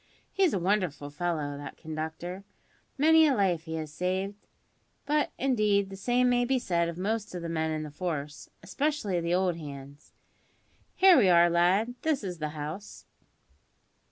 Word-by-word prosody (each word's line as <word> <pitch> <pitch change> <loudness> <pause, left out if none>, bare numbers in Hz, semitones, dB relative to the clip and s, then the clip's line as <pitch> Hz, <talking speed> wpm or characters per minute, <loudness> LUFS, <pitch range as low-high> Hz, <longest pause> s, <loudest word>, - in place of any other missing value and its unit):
He's 380 -4 +3
a - - 0
wonderful 180 -6 -1
fellow, 150 -3 -3
that 145 - -9
conductor! 160 +4 -6 0.5
Many 320 +2 +6
a 275 - +2
life 180 -6 +1
he 160 -1 -5
has 155 -2 -5
saved; 190 +4 -3 0.6
but, 295 +1 +1
indeed, 210 -7 +1
the - - -6
same 245 +5 +1
may 245 0 +3
be 260 +2 +1
said 170 -8 0
of 170 - -7
most 205 +1 -2
of 175 - -5
the 170 - -4
men 160 -1 -1
in 155 -1 -2
the 150 - -7
force, 150 -3 -5
especially 280 - -1
the 170 +1 0
old 180 -2 +1
hands. 140 -2 -10 0.8
Here 375 -1 +7
we 205 -8 +5
are, 170 0 +5
lad. 185 +7 +2
This 310 -7 0
is 180 -4 -5
the 155 -1 -2
house." 155 +8 -7
180 Hz, 165 wpm, -28 LUFS, 160-220 Hz, 0.8 s, Here